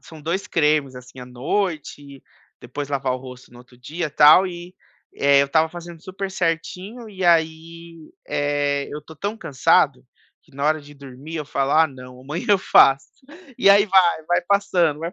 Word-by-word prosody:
são 160 Hz, -2 st, -14 dB
2 175 Hz, +5 st, -3 dB
cremes, 150 Hz, -4 st, 0 dB
assim, 125 Hz, 0 st, -13 dB
à 125 Hz, -, -9 dB
noite, 145 Hz, 0 st, -4 dB, 0.4 s
depois 140 Hz, +4 st, -7 dB
lavar 135 Hz, -2 st, -2 dB
o 130 Hz, -, -4 dB
rosto 125 Hz, -1 st, -13 dB
no 120 Hz, -, -15 dB
outro 125 Hz, 0 st, -19 dB
dia 155 Hz, +7 st, -5 dB
tal 155 Hz, +6 st, +6 dB
e, 175 Hz, +1 st, -9 dB, 0.4 s
eh, 140 Hz, 0 st, +4 dB
eu -, -, -1 dB
estava 160 Hz, +3 st, +1 dB
fazendo 170 Hz, -1 st, -11 dB
super 195 Hz, 0 st, -6 dB
certinho 185 Hz, +6 st, -4 dB
e 190 Hz, -1 st, -8 dB
aí, 165 Hz, -1 st, -1 dB, 0.2 s
eh, 145 Hz, -1 st, -1 dB
eu 150 Hz, 0 st, -7 dB
tô 160 Hz, -, -14 dB
tão 200 Hz, +7 st, -5 dB
cansado 145 Hz, -, +1 dB, 0.4 s
que -, -, -28 dB
na 140 Hz, -, -4 dB
hora 155 Hz, +1 st, +1 dB
de 145 Hz, 0 st, -15 dB
dormir 140 Hz, +3 st, -10 dB
eu 155 Hz, -, -4 dB
falo: 140 Hz, 0 st, -2 dB
"Ah 160 Hz, +1 st, +5 dB
não, 125 Hz, -3 st, -13 dB
amanhã 150 Hz, +5 st, -6 dB
eu 205 Hz, -, +4 dB
faço." 135 Hz, -7 st, +4 dB, 0.5 s
E -, -, +3 dB
aí 200 Hz, +1 st, +6 dB
vai, 180 Hz, -5 st, +2 dB
vai 175 Hz, -, +1 dB
passando 175 Hz, -6 st, +1 dB
vai 170 Hz, +2 st, -5 dB
155 Hz, 185 wpm, -21 LUFS, 140-175 Hz, 0.5 s, tal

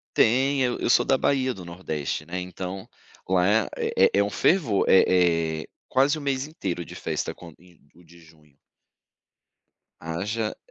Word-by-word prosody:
Tem, 135 Hz, +4 st, +3 dB
eu 125 Hz, -1 st, -1 dB
eu -, -, -1 dB
sou 120 Hz, 0 st, +4 dB
da 135 Hz, -, +3 dB
Bahia, 130 Hz, -1 st, +1 dB
do 95 Hz, -, -10 dB
Nordeste, 80 Hz, -4 st, -4 dB
né. 90 Hz, +3 st, -4 dB
Então 90 Hz, +1 st, -7 dB, 0.4 s
lá 90 Hz, -1 st, +2 dB, 0.3 s
é -, -, -1 dB, 0.2 s
é -, -, +4 dB
é -, -, +5 dB
um 100 Hz, -, -2 dB
fervor 135 Hz, -, +2 dB
é 85 Hz, -4 st, +3 dB
é, -, -, -16 dB, 0.2 s
quase 140 Hz, +4 st, +2 dB
o 155 Hz, -, -7 dB
mês 135 Hz, 0 st, -2 dB
inteiro 90 Hz, -, -4 dB
de -, -, -11 dB
festa -, -, -3 dB
com 85 Hz, -2 st, -12 dB, 0.4 s
o 90 Hz, -, -19 dB
de 85 Hz, +1 st, -18 dB
junho. 75 Hz, -3 st, -22 dB, 1.4 s
Haja 105 Hz, +7 st, -3 dB
95 Hz, 165 wpm, -25 LUFS, 85-130 Hz, 1.4 s, é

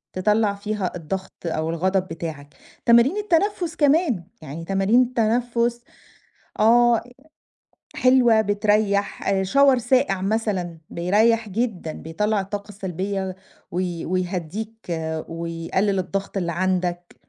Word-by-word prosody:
تطلّع 210 Hz, +2 st, +2 dB
فيها 205 Hz, -2 st, -3 dB
الضغط 180 Hz, +3 st, -5 dB
أو 160 Hz, -1 st, -1 dB
الغضب 185 Hz, +3 st, 0 dB
بتاعك. 160 Hz, -4 st, -7 dB, 0.3 s
تمارين 235 Hz, -, +5 dB
التنفس 370 Hz, -3 st, 0 dB
كمان، 290 Hz, -, +2 dB, 0.2 s
يعني 155 Hz, +2 st, -7 dB
تمارين 195 Hz, +6 st, +3 dB
التنفس 235 Hz, 0 st, 0 dB, 0.8 s
آه، 235 Hz, +1 st, +5 dB, 0.9 s
حلوة، 250 Hz, -3 st, +5 dB
بتريح. 205 Hz, -1 st, +1 dB
آآ 195 Hz, -1 st, +2 dB
shower 275 Hz, +7 st, +5 dB
ساقع 245 Hz, -5 st, +1 dB
مثلًا، 195 Hz, -5 st, -1 dB
بيريح 215 Hz, +6 st, +2 dB
جدًا، 200 Hz, -6 st, -2 dB
بيطلّع 210 Hz, +8 st, -1 dB
الطاقة 200 Hz, +2 st, -5 dB
السلبية، 190 Hz, -1 st, -4 dB, 0.3 s
وي 175 Hz, -1 st, -3 dB
ويهدّيك، 185 Hz, +4 st, -3 dB, 0.5 s
ويقلل 170 Hz, +4 st, -1 dB
الضغط 195 Hz, +2 st, -3 dB
اللي 175 Hz, -3 st, -1 dB
عندك، 175 Hz, 0 st, -1 dB
200 Hz, 105 wpm, -23 LUFS, 180-230 Hz, 0.9 s, تمارين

